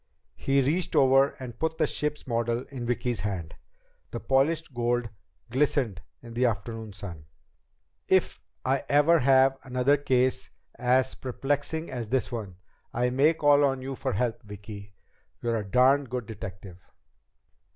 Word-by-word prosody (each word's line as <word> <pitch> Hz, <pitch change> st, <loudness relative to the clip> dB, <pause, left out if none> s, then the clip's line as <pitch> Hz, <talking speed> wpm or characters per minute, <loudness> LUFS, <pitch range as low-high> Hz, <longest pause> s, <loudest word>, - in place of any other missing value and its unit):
He 135 Hz, 0 st, +1 dB
reached 160 Hz, +6 st, 0 dB
over 135 Hz, +1 st, +5 dB
and 125 Hz, -3 st, -8 dB
put 160 Hz, 0 st, -1 dB
the 160 Hz, -, +3 dB
ship's 150 Hz, 0 st, -3 dB
model 120 Hz, 0 st, -1 dB
in 125 Hz, -3 st, -5 dB
Vicki's 125 Hz, -2 st, -1 dB
hand. 95 Hz, -5 st, -4 dB, 0.6 s
The 120 Hz, -, -5 dB
polished 140 Hz, +4 st, +1 dB
gold 120 Hz, 0 st, 0 dB, 0.4 s
glistened 130 Hz, -, +1 dB, 0.2 s
in 120 Hz, -1 st, -10 dB
the 120 Hz, +2 st, 0 dB
afternoon 110 Hz, 0 st, -4 dB
sun. 90 Hz, -6 st, -9 dB, 0.8 s
"If -, -, +2 dB, 0.2 s
I 135 Hz, +1 st, +1 dB
ever 150 Hz, +4 st, +5 dB
have 135 Hz, 0 st, +4 dB
another 130 Hz, +2 st, +2 dB
case 130 Hz, -2 st, +1 dB, 0.2 s
as 130 Hz, +1 st, +2 dB
perplexing 145 Hz, +5 st, -2 dB
as 120 Hz, -3 st, -4 dB
this 130 Hz, +3 st, -1 dB
one, 105 Hz, -6 st, -5 dB, 0.4 s
I 125 Hz, +1 st, 0 dB
may 145 Hz, +6 st, +3 dB
call 145 Hz, -2 st, +4 dB
on 135 Hz, -2 st, +1 dB
you 135 Hz, +1 st, -4 dB
for 130 Hz, -, -3 dB
help, 115 Hz, +3 st, -1 dB
Vicki. 105 Hz, -1 st, -10 dB, 0.5 s
You're 115 Hz, -1 st, -1 dB
a 105 Hz, -, -2 dB
darn 130 Hz, +7 st, +4 dB
good 125 Hz, -2 st, -4 dB
detective." 95 Hz, -4 st, -9 dB
125 Hz, 145 wpm, -27 LUFS, 115-135 Hz, 0.8 s, over